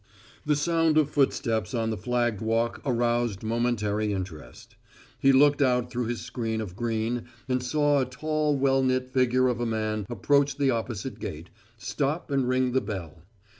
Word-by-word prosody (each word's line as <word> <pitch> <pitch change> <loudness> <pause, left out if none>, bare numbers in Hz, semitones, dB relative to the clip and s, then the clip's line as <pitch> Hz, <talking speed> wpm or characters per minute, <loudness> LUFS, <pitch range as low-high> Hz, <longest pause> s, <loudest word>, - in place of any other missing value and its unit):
The 150 - +3
sound 165 +1 +2
of 150 -1 +3
footsteps 115 -6 0
on 115 -1 0
the - - -1
flagged 120 0 -1
walk 115 +1 0
aroused 120 -5 0
momentary 110 -2 0
interest. 90 -5 -7 0.4
He 135 - +5
looked 145 +2 +5
out 125 -2 +2
through 125 -2 -2
his 120 0 -3
screen 115 -3 -3
of 100 -5 -5
green 115 +1 -2 0.2
and 130 -1 0
saw 145 +2 +2
a - - +1
tall 150 +3 -1
well 135 0 +3
knit 130 0 0
figure 130 0 +3
of 125 -1 -1
a 120 - -1
man 110 -2 -2
approach 140 +3 +2
the 140 -2 +2
opposite 115 +1 -4
gate, 80 +3 -7 0.3
stop 145 +7 -2
and 135 -3 +1
ring 130 0 +2
the 130 +1 +2
bell. 90 -8 -6
125 Hz, 170 wpm, -27 LUFS, 110-135 Hz, 0.4 s, He